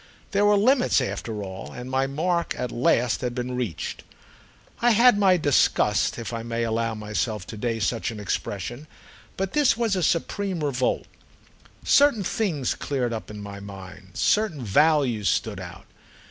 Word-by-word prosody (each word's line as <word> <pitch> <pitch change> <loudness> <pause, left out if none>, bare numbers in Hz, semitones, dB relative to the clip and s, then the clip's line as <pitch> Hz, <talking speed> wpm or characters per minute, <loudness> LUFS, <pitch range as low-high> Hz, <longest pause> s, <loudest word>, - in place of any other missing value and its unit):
There 205 +1 +2
were 205 0 +5
limits 250 - +3
after 115 -4 -3
all, 95 -1 -7
and 125 0 -7
my 130 +1 0
mark 170 +5 -1
at 125 - -3
last 125 -2 +1
had 125 -1 -3
been 125 0 -3
reached. 115 -10 -4 0.8
I 240 - +5
had 235 0 +4
had 245 -4 +7
my 190 -3 +5
disgusts, 145 -4 +2
if 115 0 -5
I 115 - -3
may 115 0 -2
allow 115 0 -1
myself 105 -1 -3
to 110 - -8
day 115 +1 -2
such 115 +3 -1
an 110 -2 -7
expression; 105 +7 -4 0.5
but 190 0 -2
this 280 -4 +3
was 230 -4 +1
a 185 - 0
supreme 175 +1 -1
revolt. 130 -3 0 0.8
Certain 280 -8 +4
things 170 - -1
cleared 125 -4 -2
up 110 - -6
in 105 -1 -8
my 100 0 -8
mind, 95 -1 -11
certain 205 -11 +1
values 125 -2 +3
stood - - -1
out. - - -9
125 Hz, 165 wpm, -25 LUFS, 110-180 Hz, 0.8 s, had